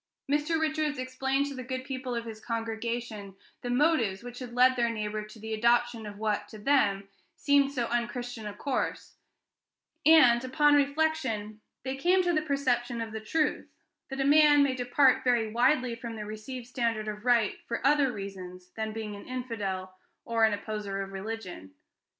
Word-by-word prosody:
Mr. 300 +3 +1
Richards 310 -2 0
explained 265 +2 -1
to 285 - -5
the 260 - -6
good 255 +1 -4
people 260 -2 -4
of 235 0 -3
his 220 -1 -9
congregation 225 -3 -4 0.3
the 245 - -4
motives 245 -7 +2
which 245 0 -8
had 250 -2 -7
led 255 +1 +5
their 235 -1 +1
neighbor 215 -1 -3
to 215 +1 -13
the 220 +1 -6
adoption 235 0 +2
of 205 -1 -8
what, 210 -1 -1
to 215 - -11
them, 205 -5 +2 0.3
seemed 285 -1 +3
so 250 -4 -1
unchristian 240 -1 -3
a 205 - -5
course; 270 +3 -3 0.9
and, 255 -7 +6
upon 295 +3 +3
reflection, 280 -8 0 0.2
they 265 0 -3
came 360 +7 +3
to 350 -1 +1
the 310 - +2
perception 255 -5 0
of 225 -1 -4
the 220 0 -5
truth, 300 +8 -1 0.4
that 270 0 -5
a 270 - +1
man 295 0 +6
may 275 -2 +1
depart 255 +1 +3
very 235 -3 +2
widely 245 +1 +2
from 230 0 -7
the 210 -1 -6
received 215 +4 -7
standard 230 -3 -2
of 210 0 -5
right 235 -4 +2
for 235 - -3
other 285 -2 +4
reasons 185 -4 -8
than 220 -1 -4
being 215 -2 -5
an 200 - -11
infidel 200 -7 -4 0.3
or 230 -1 +3
an 220 - +2
opposer 205 -1 -4
of 195 - -9
religion. 190 - -7
240 Hz, 175 wpm, -29 LUFS, 215-270 Hz, 0.9 s, and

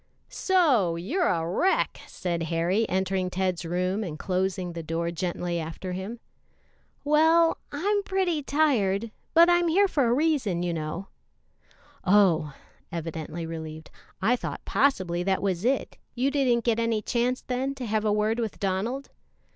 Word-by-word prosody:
"So, 275 - +2
you're 280 - 0
a 165 -2 0
wreck," 355 - +1
said 175 -2 -3
Harry, 175 +7 +1
entering 190 0 0
Ted's 185 -1 -1
room 180 +5 -1
and 160 -6 -5
closing 185 0 -1
the 170 - -5
door 165 +1 -2
gently 175 0 -2
after 165 +3 -5
him. 190 +6 -5 0.8
"Well, 320 +3 +4
I'm 405 +8 0
pretty 380 -5 0
tired, 230 -9 +1 0.2
but 335 +1 +8
I'm 350 0 +4
here 390 +5 +4
for 280 -9 +1
a 230 - +3
reason, 260 - +1
you 175 -1 -1
know." 160 +4 -4 0.9
"Oh!" 175 -7 +3 0.4
evidently 165 0 -5
relieved; 160 -1 -7 0.3
"I 235 +5 +4
thought - - -6
possibly 185 -11 +1
that 190 +1 +1
was 190 -2 -1
it; 260 +3 0 0.2
you 260 +3 +1
didn't 255 -5 +2
get 230 -1 +2
any 230 -2 0
chance, 245 +3 0
then, 260 +2 -2
to 255 - -5
have 215 -1 0
a 215 - +2
word 210 +2 +1
with 225 -3 -3
Donald?" 210 +8 -2
205 Hz, 150 wpm, -26 LUFS, 175-270 Hz, 0.9 s, but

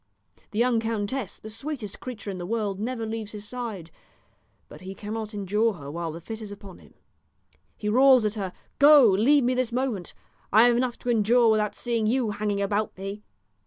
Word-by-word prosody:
The 210 - -7
young 240 0 +3
countess, 225 0 -3
the 215 - -10
sweetest 240 -4 -6
creature 225 -5 -6
in 185 - -6
the 175 - -5
world, 210 -3 -2
never 230 +1 -3
leaves 220 -1 -5
his 210 0 -8
side; 220 -10 -6 0.8
but - - -13
he 190 +1 -8
cannot 215 +1 -5
endure 210 +3 +1
her 145 -6 -9
while 165 +1 -4
the 165 - -8
fit 220 +6 -8
is 210 -2 -8
upon 200 -2 -11
him. - - -20 0.8
He 210 - -5
roars 255 +1 +5
at 210 - 0
her, 195 -4 -4 0.3
'Go, 290 -2 +8
leave 240 +9 +4
me 250 +1 +2
this 250 -2 0
moment! 240 -8 -2 0.4
I 220 +3 +7
have 240 0 +5
enough 245 0 0
to 245 - 0
endure 230 +1 +4
without 210 -1 +1
seeing 230 -3 -1
you 235 -1 +1
hanging 205 -1 -1
about 205 +1 -1
me!' 195 +2 -6
215 Hz, 195 wpm, -26 LUFS, 200-240 Hz, 0.8 s, Go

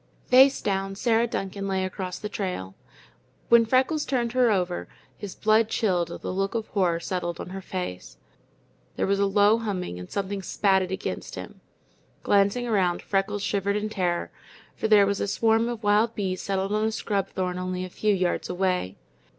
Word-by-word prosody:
Face 265 +2 +6
down, 195 -1 -1
Sarah 230 +2 +2
Duncan 195 -2 -4
lay 190 -1 0
across 185 -1 -5
the 210 - -5
trail. 180 - -4 0.8
When 235 -1 +6
Freckles 265 +5 +2
turned 240 -3 -1
her 250 -1 +3
over, 180 -4 -1 0.3
his 200 -3 -8
blood 215 +1 +3
chilled 180 -7 0
at - - -7
the - - -3
look 195 +3 -1
of 225 -1 -1
horror 180 -5 +1
settled 175 -1 -3
on - - -6
her 195 0 -6
face. 180 - -6 0.8
There - - 0
was 200 0 +1
a 200 - +3
low 205 +3 +4
humming 185 - -4
and 90 - -9
something 200 0 -3
spatted 190 -1 +1
against 190 +1 -4
him. - - -9 0.6
Glancing 200 +5 +2
around, 190 -6 +1
Freckles 195 +1 -1
shivered 200 0 0
in 210 +1 -1
terror, 180 -4 -1 0.4
for - - -1
there 210 -2 +6
was 200 0 -1
a - - 0
swarm 225 +3 +2
of 235 -2 -5
wild 210 +3 +3
bees 185 -3 -2
settled 195 0 -2
on 215 +1 +1
a 220 - +1
scrub 205 -3 -1
thorn 180 -1 -3
only 185 0 -3
a - - -8
few 210 +1 +1
yards 180 -2 -1
away. 180 - -1
195 Hz, 185 wpm, -26 LUFS, 185-215 Hz, 0.8 s, Face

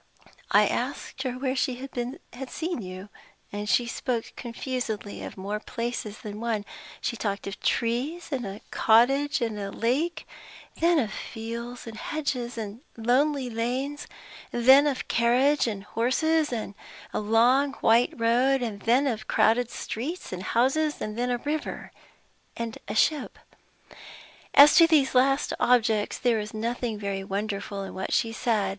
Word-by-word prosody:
I - - +6
asked - - -3
her 260 -2 -2
where 260 +1 -2
she 255 -1 0
had 255 +1 -6
seen 335 -5 -3
you. 185 +1 -8 0.6
She 240 +2 +3
spoke 235 0 -3
confusedly 235 -4 -4
of - - -8
more 200 +3 -3
places 230 -2 -4
than 210 -3 -7
one. 225 -3 -1 0.4
She 235 - -2
talked 200 -3 -3
of 195 - -6
trees, 255 +9 -1
and 265 -3 -1
a 200 0 -6
cottage, 270 +5 +3
and 225 -3 -2
a 200 -1 -4
lake; 305 +11 -1 0.5
then 340 0 +4
of 225 -8 0
fields 235 +2 -6
and 225 -1 -8
hedges, 255 -6 -3
and 220 +1 -6 0.2
lonely 260 +4 +2
lanes; 250 +5 -3 0.4
then 265 +5 +6
of 275 -3 -1
a - - -6
carriage 250 +5 +3
and 205 -3 -4
horses, 290 +9 +1
and 220 -4 -3 0.4
a - - 0
long 240 +6 +3
white 235 -1 +3
road; 250 +4 +3 0.2
then 250 +5 +4
of 220 -5 -2
crowded 235 +2 +3
streets 275 - -5
and 180 - -4
houses, 270 +9 +1
and 215 +2 -4
a 245 0 0
river 295 +4 -4 0.7
and 230 -1 -4
a 210 - -4
ship. 295 +3 +1 1.2
As 290 +1 +9
to 335 -2 +8
these 295 -5 +3
last 270 +2 +3
objects, 225 -4 +2
there 240 -3 +2
is 210 +1 -6
nothing 230 0 -2
very 200 -1 -3
wonderful 200 0 -3
in 195 - -7
what 190 - -4
she 230 - +2
said. 220 -4 0
240 Hz, 150 wpm, -26 LUFS, 220-270 Hz, 1.2 s, As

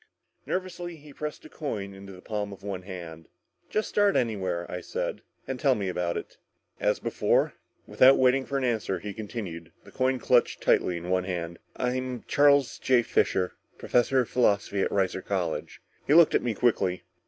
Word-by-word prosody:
Nervously 180 -2 -3
he 150 -2 -14
pressed 150 +1 -6
a - - -11
coin 105 -10 -5
into 95 0 -11
the 90 -1 -13
palm 105 -2 -3
of 100 - -11
one 100 -2 -4
hand. 85 -4 -9 0.4
"Just 215 - 0
start 205 -1 +2
anywhere," 95 -7 0
I 90 - -5
said, - - -4 0.3
"and 130 -1 -4
tell 135 -3 +3
me 100 -3 -3
all 95 - -1
about 90 -1 -1
it." - - -8 0.4
"As - - +2
before?" - - +1 0.3
Without 130 +1 +6
waiting 130 +1 +4
for 140 - -1
an 135 - -1
answer, 110 -6 0
he 100 +3 -6
continued, 100 -7 -6
the - - -15
coin 130 0 +1
clutched 125 0 +2
tightly 90 - +2
in 85 +2 -5
one 90 -1 +1
hand. 85 -2 -4 0.2
"I'm 125 0 -2
Charles 140 -2 +4
J. 125 -2 +3
Fisher, 90 -4 +1 0.3
professor 125 +2 +2
of 120 - -4
Philosophy 100 -4 +2
at - - +1
Reiser 95 -1 0
College." 90 -5 -3 0.2
He 145 - +5
looked 170 -2 +7
at - - +3
me 120 -3 -2
quickly. 95 -6 +1
105 Hz, 185 wpm, -27 LUFS, 95-130 Hz, 0.4 s, looked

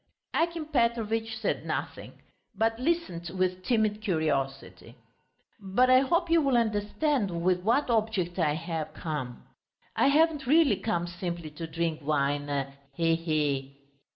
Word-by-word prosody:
Akim 335 -1 0
Petrovitch 225 -5 0
said 220 - -2
nothing, - - -4 0.4
but 225 +1 0
listened 255 - -1
with 185 0 0
timid 215 -3 +1
curiosity. 150 -8 -2 0.6
"But 210 +6 +2
I 255 - +8
hope 340 +7 +1
you 335 -1 +5
will 275 -4 +2
understand, 220 +3 0
with 180 0 +2
what 235 +9 +2
object 210 -6 0
I 150 -3 +2
have 160 -1 -4
come.... 145 -7 -5 0.5
I - - +3
haven't 300 -1 +3
really 290 - +5
come 175 -6 -1
simply 175 -2 -5
to 165 +2 -7
drink 165 -1 -2
wine... 145 -1 -1 0.2
he 165 +1 +2
he!" 145 -4 -1
190 Hz, 130 wpm, -28 LUFS, 160-240 Hz, 0.6 s, I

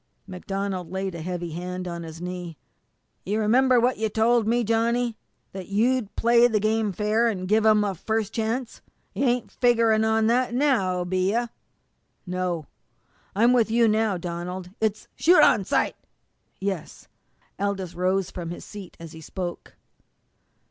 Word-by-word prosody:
MacDonald 190 -1 -4
laid 190 0 -3
a 170 - -6
heavy 175 0 -4
hand 180 +2 -5
on 170 -1 -5
his 165 -1 -9
knee. 175 -2 -6 0.7
"You 210 +3 -1
remember 250 +4 +4
what 245 0 +1
you 220 0 0
told 225 +1 +2
me, 240 +1 +2
Johnny, 230 +1 +1 0.4
that 190 -2 -8
you'd 225 +2 0
play 235 +1 +5
the 220 -3 +1
game 215 0 +1
fair, 210 +4 +1
and 185 -5 -2
give 220 +2 +3
'em 215 -1 +5
a 200 -2 -1
first 220 +4 -2
chance? 230 +2 -3 0.3
You - - 0
ain't 245 -1 0
figgerin' 230 -3 +3
on 220 0 +2
that 240 +1 +1
now, 210 -10 +1
be 185 +2 0
you?" 235 +1 0 0.8
"No, 180 -3 -2 0.7
I'm 235 +4 +4
with 235 -3 +3
you 230 +1 +4
now, 215 -2 +1
Donald. 175 +1 -5
It's 220 -1 -1
" - - -46
"Shoot 355 +2 +5
on - - +4
sight!" - - +1 0.6
"Yes." 195 -4 -5 0.5
Aldous 195 -3 -2
rose 185 +1 0
from 170 -2 -6
his 175 - -7
seat 205 -3 -10
as 165 -1 -9
he 160 -1 -11
spoke. 175 +2 -6
210 Hz, 160 wpm, -25 LUFS, 180-230 Hz, 0.8 s, play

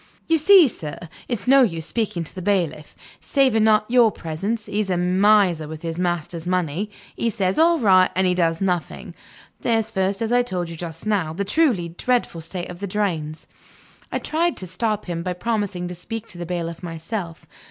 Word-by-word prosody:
"You 325 -1 +2
see, 370 0 +7
sir, 155 - -5 0.3
it's 240 -2 -4
no 275 +1 +7
use 165 -10 +1
speaking 205 -6 -2
to 155 - -9
the 185 - -7
bailiff. 170 -6 -1 0.2
Saving 255 -6 +2 0.2
your 235 -2 +5
presence, 200 +8 -4
he's 205 -1 -2
a 180 - +1
miser 180 -2 +3
with 160 +1 -8
his 165 0 -4
master's 175 -1 -2
money. 180 +2 -1 0.3
He 235 - 0
says, 195 0 -1
'All 335 +1 +5
right,' 190 -8 +5
and 190 +1 +2
he 180 - +3
does 165 -1 0
nothing. 180 -4 -2 0.5
There's 225 -1 0
first, 195 +1 0
as 225 +1 -1
I 245 - +5
told 180 -8 -3
you - - -6
just 165 +1 -7
now, 195 -7 0
the 200 +4 -3
truly 210 - +2
dreadful 175 -1 -1
state 175 +2 -6
of 175 - -10
the 200 - -4
drains 170 -6 -2 0.3
" - - -28
I - - 0
tried 335 +2 -1
to 185 - -4
stop 210 +4 -2
him 170 -2 -3
by 180 +1 -2
promising 200 -3 -2
to - - -5
speak 220 +6 -6
to 175 - -7
the 175 - -5
bailiff 170 -1 -4
myself. 170 +1 -6
185 Hz, 195 wpm, -22 LUFS, 170-220 Hz, 0.5 s, see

